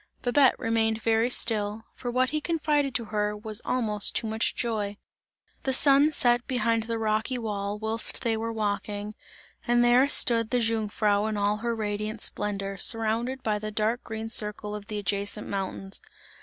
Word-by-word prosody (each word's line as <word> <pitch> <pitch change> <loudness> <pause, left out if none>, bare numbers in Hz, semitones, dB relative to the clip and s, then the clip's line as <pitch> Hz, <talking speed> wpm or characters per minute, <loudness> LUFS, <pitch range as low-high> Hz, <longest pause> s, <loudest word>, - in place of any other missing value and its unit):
Babette 260 +2 +4
remained 225 -1 0
very 225 +1 +2
still, 220 -2 0
for 245 - -6
what 255 +1 +1
he 305 0 -1
confided 295 -5 0
to 235 - 0
her 210 0 0
was 215 +1 -3
almost 215 -5 0
too - - 0
much 220 +1 -1
joy. 210 -4 -2 0.6
The 265 - -1
sun 280 +2 +5
set 245 -5 +2
behind 230 -3 +1
the 230 0 -2
rocky 220 +3 0
wall, 205 -3 -3
whilst 220 +1 +1
they 230 -1 +1
were 225 +1 -3
walking, 210 -1 -3 0.5
and 240 0 +4
there 245 +3 +5
stood 230 -5 +3
the 250 - +1
Jungfrau 215 -2 +1
in 215 -1 -2
all 205 +1 +1
her 235 +1 -2
radiant 215 0 -3
splendour, 195 -1 -2
surrounded 230 +5 0
by 210 -1 0
the 215 0 -4
dark 220 +3 0
green 220 0 -6
circle 210 -1 -2
of 210 -1 -7
the 215 -2 -4
adjacent 205 +1 -2
mountains. 195 0 -3
220 Hz, 170 wpm, -27 LUFS, 210-240 Hz, 0.6 s, sun